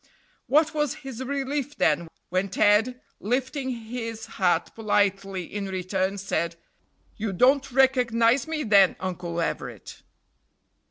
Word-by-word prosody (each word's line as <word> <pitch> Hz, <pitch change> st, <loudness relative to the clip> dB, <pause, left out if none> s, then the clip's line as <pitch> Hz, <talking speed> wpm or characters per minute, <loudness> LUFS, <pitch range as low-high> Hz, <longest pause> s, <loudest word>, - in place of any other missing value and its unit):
What 305 Hz, +1 st, +3 dB
was 295 Hz, -3 st, 0 dB
his 260 Hz, -1 st, -5 dB
relief, 280 Hz, +1 st, -3 dB
then, 160 Hz, +2 st, +2 dB, 0.2 s
when 185 Hz, +2 st, 0 dB
Ted, 210 Hz, +6 st, +3 dB, 0.2 s
lifting 260 Hz, +4 st, -2 dB
his 230 Hz, -2 st, -5 dB
hat 180 Hz, -2 st, 0 dB
politely 200 Hz, -3 st, 0 dB
in 200 Hz, +3 st, -5 dB
return, 190 Hz, +1 st, -2 dB
said: 170 Hz, -3 st, -2 dB, 0.6 s
"You 215 Hz, -1 st, -2 dB
don't 265 Hz, +8 st, +3 dB
recognize 250 Hz, -1 st, +3 dB
me 315 Hz, -1 st, -2 dB
then, 200 Hz, -5 st, +5 dB
Uncle 175 Hz, -2 st, -4 dB
Everett?" 165 Hz, -, -4 dB
225 Hz, 115 wpm, -25 LUFS, 190-260 Hz, 0.6 s, then